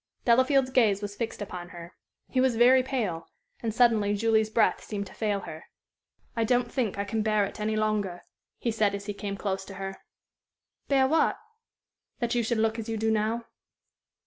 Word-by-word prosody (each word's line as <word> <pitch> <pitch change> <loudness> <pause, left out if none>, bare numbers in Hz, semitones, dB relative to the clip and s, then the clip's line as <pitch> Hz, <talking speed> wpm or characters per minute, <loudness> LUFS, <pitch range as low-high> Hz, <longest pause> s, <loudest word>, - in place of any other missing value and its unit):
Delafield's 260 +2 +4
gaze 210 -6 +3
was 205 0 -5
fixed 225 -1 -4
upon 175 -3 -7
her. 170 0 -10 0.3
He 255 - +1
was 260 -2 +2
very 250 +3 +6
pale, 230 -11 -3 0.3
and 230 - -1
suddenly 220 -3 +3
Julie's 220 0 +2
breath 225 +1 +2
seemed 200 -2 -4
to 190 - -13
fail 205 -3 -1
her. 160 -2 -9 0.7
"I 230 - +1
don't 245 +1 +1
think 230 -7 -1
I 200 - 0
can 220 +2 -1
bear 215 -1 +2
it 195 - -8
any 215 +1 -1
longer," 210 -4 -1 0.3
he 235 - -1
said, 210 -2 +1
as 200 0 -7
he 205 - -3
came 200 0 -5
close 195 -1 -2
to 195 - -10
her. 195 0 -5 0.9
"Bear 270 -2 +4
what?" 320 +3 +2 0.8
"That 235 -2 -1
you 240 - +2
should 235 +1 0
look 225 +1 +1
as 225 0 -5
you 225 - -2
do 220 +1 +1
now." 220 +2 0
220 Hz, 190 wpm, -27 LUFS, 200-235 Hz, 0.9 s, very